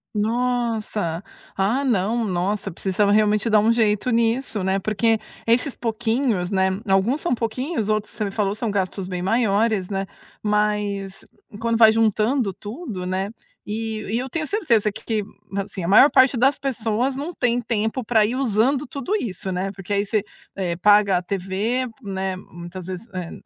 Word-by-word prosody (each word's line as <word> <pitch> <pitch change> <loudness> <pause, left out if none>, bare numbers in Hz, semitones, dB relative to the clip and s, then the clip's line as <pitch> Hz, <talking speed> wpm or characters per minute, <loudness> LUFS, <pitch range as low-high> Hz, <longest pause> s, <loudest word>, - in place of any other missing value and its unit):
Nossa! 220 -6 -1 0.3
Ah, 220 +9 +1
não, 230 -1 +1
nossa, 195 +1 -1
precisava 195 +4 0
realmente 210 +1 +3
dar 215 -1 +5
um 220 +2 +3
jeito 220 +1 +1
nisso, 230 -2 +1
né? 190 +1 +1
Porque 215 +3 +1 0.3
esses 245 +4 +2
pouquinhos, 225 -4 -1
né, 190 -1 +2 0.2
alguns 195 +9 +2
são 345 -5 0
pouquinhos, 230 +1 -2
outros 215 -1 0
você 215 - -2
me 205 - -1
falou 200 -1 -1
são 225 +1 -2
gastos 195 -1 -2
bem 180 -1 -4
maiores, 215 -2 +1
né? 195 -1 -2 0.4
Mas 210 -2 -1 0.3
quando 230 0 0
vai 220 -1 +8
juntando 220 +1 +1
tudo, 210 - -6
né? 190 +3 -2 0.3
E, 220 +1 -3
e 230 - +1
eu 260 +1 -4
tenho 315 +3 -2
certeza 245 - +2
que - - -10
que, 220 -2 -1 0.3
assim, 195 -2 -4
a - - -2
maior 220 +9 +7
parte 260 -1 +5
das 270 +4 +3
pessoas 245 0 -1
não 305 +6 -4
têm 245 0 +1
tempo 225 +1 -1
pra 220 -1 +3
ir 225 +4 0
usando 260 +2 +1
tudo 285 - -3
isso, 195 - -3
né? 185 +2 -2
Porque 195 0 -6
aí 200 +1 +1
você, 210 0 0 0.3
eh, 180 -3 -1
paga 205 +1 +5
a 180 - -1
TV, 200 +7 -1 0.2
né, 190 -1 -3
muitas 175 0 -9
vezes, 185 +4 -6
eh, 175 -2 -4
215 Hz, 170 wpm, -22 LUFS, 195-235 Hz, 0.4 s, vai